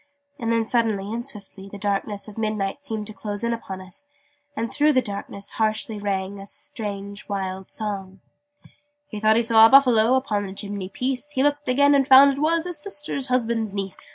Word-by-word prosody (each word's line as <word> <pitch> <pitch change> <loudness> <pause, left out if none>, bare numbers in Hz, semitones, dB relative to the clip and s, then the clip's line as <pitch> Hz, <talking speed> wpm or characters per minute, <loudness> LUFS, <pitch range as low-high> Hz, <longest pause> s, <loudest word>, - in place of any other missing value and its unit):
And 230 -1 -1
then 230 0 +2
suddenly 220 -3 0
and 235 +1 -3
swiftly 200 -3 -10
the 200 - -9
darkness 200 +1 -2
of 210 - -11
midnight 215 +2 -2
seemed 220 -7 -4
to 215 - -7
close 205 0 -5
in 235 0 +1
upon 190 -5 -6
us 185 +10 -10 0.5
and 230 +1 -3
through 300 +1 +3
the 260 - +4
darkness 200 -1 -7
harshly 215 -1 -1
rang 200 -1 -3
a 195 - -10
strange 200 -1 -7
wild 190 -1 -4
song: 195 -3 -6 0.9
He 215 - -6
thought 215 +1 +4
he 235 - +3
saw 225 -1 +7
a - - -1
Buffalo 250 -3 +6
Upon 235 -6 0
the 195 -2 -6
chimney 200 -2 -5
piece: 255 +7 -3
He 265 - +1
looked 290 -1 0
again, 285 +3 +4
and 275 -2 +3
found 275 +1 +8
it 275 - -6
was 325 +1 +2
His 350 -4 -3
Sister's 295 -6 -2
Husband's 230 -4 0
Niece. 195 -1 -3
220 Hz, 195 wpm, -23 LUFS, 200-255 Hz, 0.9 s, found